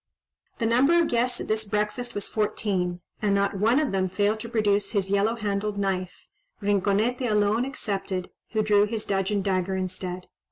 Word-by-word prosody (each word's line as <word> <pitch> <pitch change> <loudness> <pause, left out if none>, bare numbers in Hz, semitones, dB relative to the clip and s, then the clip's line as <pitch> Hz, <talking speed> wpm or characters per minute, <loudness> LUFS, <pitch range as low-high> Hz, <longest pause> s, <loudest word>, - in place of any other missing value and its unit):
The 230 - -1
number 265 +9 +4
of 335 - +2
guests 245 +1 +1
at - - -5
this 215 0 0
breakfast 210 +4 -2
was 205 - -3
fourteen, 190 -4 -1 0.2
and 205 -2 +2
not 200 -1 0
one 230 +7 +4
of 305 -3 0
them 190 -1 0
failed 205 +3 +1
to 230 - -6
produce 205 -3 +1
his 195 -2 0
yellow 205 +3 +2
handled 205 -1 -2
knife, 185 -2 -2 0.3
Rinconete 205 +5 +1
alone 210 +3 +2
excepted, 195 -8 -3 0.2
who 215 -1 +2
drew 205 -1 +4
his 220 0 -3
dudgeon 195 0 0
dagger 190 -1 0
instead. 185 -1 -4
205 Hz, 170 wpm, -26 LUFS, 195-220 Hz, 0.3 s, number